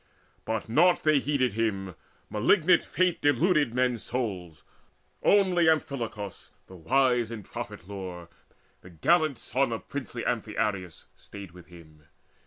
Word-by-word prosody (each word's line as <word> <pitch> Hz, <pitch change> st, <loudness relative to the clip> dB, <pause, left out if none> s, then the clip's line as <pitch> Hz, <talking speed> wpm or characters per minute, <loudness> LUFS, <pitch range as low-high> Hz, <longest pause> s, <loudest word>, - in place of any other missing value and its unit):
But 110 Hz, -1 st, -3 dB
naught 170 Hz, +10 st, +3 dB
they 155 Hz, -2 st, +4 dB
heeded 135 Hz, -5 st, 0 dB
him; 100 Hz, -4 st, -2 dB, 0.3 s
malignant 155 Hz, -, +3 dB
Fate 180 Hz, -1 st, 0 dB
Deluded 145 Hz, -2 st, +2 dB
men's 125 Hz, -3 st, +1 dB
souls: 95 Hz, -10 st, -4 dB, 0.6 s
only 185 Hz, -5 st, +4 dB
Amphilochus 120 Hz, -, -3 dB, 0.2 s
The 95 Hz, -, -14 dB
wise 120 Hz, +5 st, +2 dB
in 115 Hz, -3 st, -7 dB
prophet 90 Hz, -, -8 dB
lore, 90 Hz, -4 st, -7 dB, 0.5 s
the 90 Hz, -, -13 dB
gallant 155 Hz, -, +2 dB
son 135 Hz, +1 st, -1 dB
Of 115 Hz, -, -5 dB
princely 130 Hz, -4 st, -5 dB
Amphiaraus, 105 Hz, -7 st, -2 dB
stayed 100 Hz, -3 st, -11 dB
with 90 Hz, 0 st, -15 dB
him. 80 Hz, -3 st, -16 dB
115 Hz, 125 wpm, -27 LUFS, 95-145 Hz, 0.6 s, they